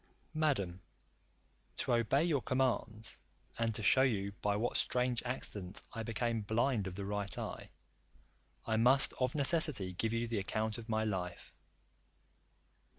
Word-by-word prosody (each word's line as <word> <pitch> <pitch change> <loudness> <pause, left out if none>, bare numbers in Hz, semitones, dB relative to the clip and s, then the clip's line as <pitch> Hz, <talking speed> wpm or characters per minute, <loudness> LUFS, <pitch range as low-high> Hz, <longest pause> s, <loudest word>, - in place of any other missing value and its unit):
Madam, 120 - 0 1.0
to - - 0
obey 120 +5 +3
your 155 -6 +1
commands, 120 -4 -1 0.4
and 115 -2 0
to 110 - -2
shew 130 - +6
you 100 -7 +1
by 105 -1 +1
what 115 +4 -1
strange 125 -1 +1
accident 105 -7 -5
I 115 - -4
became 115 0 -1
blind 110 0 +1
of 90 - -6
the 100 0 -4
right 100 0 -1
eye, - - -5 1.0
I 110 -1 +1
must 130 +4 +5
of 130 +1 0
necessity 140 - +3
give 110 +5 -1
you 115 +1 -1
the 115 -2 -1
account 110 +3 -2
of 115 0 -11
my 110 0 +1
life. 90 -5 -4
115 Hz, 145 wpm, -34 LUFS, 105-125 Hz, 1.0 s, shew